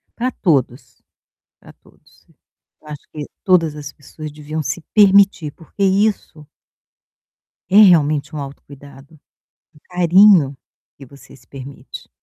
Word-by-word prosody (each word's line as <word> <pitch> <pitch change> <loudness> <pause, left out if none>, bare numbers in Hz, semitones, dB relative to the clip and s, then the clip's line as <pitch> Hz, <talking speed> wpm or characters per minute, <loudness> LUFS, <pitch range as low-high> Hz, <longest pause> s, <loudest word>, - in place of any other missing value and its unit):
pra 250 +2 -3
todos, 130 - -2 0.6
pra - - -16
todos. - - -27 0.6
Eu 155 - -16
acho 150 -1 -11
que 150 -1 -7 0.2
todas 170 -5 +2
as 145 -1 -9
pessoas 155 +2 -11
deviam 155 +1 -6
se 155 +5 -5
permitir 200 -6 +4
porque 165 +6 -9
isso 195 -6 -1 1.2
é 195 - +2
realmente 155 -5 +2
um - - -5
autocuidado, 140 +1 -13 0.5
um - - -23
carinho 180 -4 +4 0.4
que 140 - -13
você 140 +2 -17
se - - -23
permite. 135 0 -12
155 Hz, 125 wpm, -18 LUFS, 140-180 Hz, 1.2 s, permitir